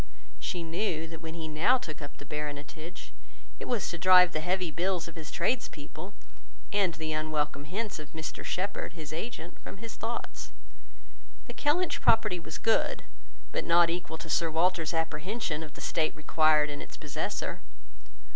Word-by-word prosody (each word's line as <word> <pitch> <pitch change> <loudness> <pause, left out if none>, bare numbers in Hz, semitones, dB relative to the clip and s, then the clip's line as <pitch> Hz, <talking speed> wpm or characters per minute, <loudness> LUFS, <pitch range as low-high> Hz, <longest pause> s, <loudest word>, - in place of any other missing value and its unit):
She 175 -2 -2
knew, 165 -1 -1
that 165 0 -8
when 160 0 -6
he 160 -1 -4
now 165 +12 +4
took 155 -10 -7
up 145 0 -8
the - - -10
Baronetage, 150 +3 -5 0.5
it - - -5
was 240 -5 +1
to 170 - -4
drive 180 0 +8
the 155 - +1
heavy 180 +1 0
bills 175 +2 0
of 165 - -9
his 160 -2 -6
tradespeople, 185 - -2 0.6
and 195 -5 +3
the 160 -1 -2
unwelcome 150 -2 0
hints 205 +3 -3
of 150 -1 -9
Mr 160 -1 -5
Shepherd, 190 -2 -2
his 155 -3 -7
agent, 175 -1 -5
from - - -9
his 225 +3 -7
thoughts. 235 +1 -4 0.9
The - - -7
Kellynch 325 +5 +2
property 215 -5 +4
was 165 - -6
good, 225 0 +2 0.5
but - - 0
not 170 0 +6
equal 170 -2 -3
to 165 - -8
Sir 165 +1 +3
Walter's 165 0 +2
apprehension 160 +2 -1
of 155 -2 -8
the - - -9
state 160 -2 +1
required 155 0 +4
in 145 - -5
its - - -9
possessor. 155 +6 -2
165 Hz, 165 wpm, -30 LUFS, 155-185 Hz, 0.9 s, drive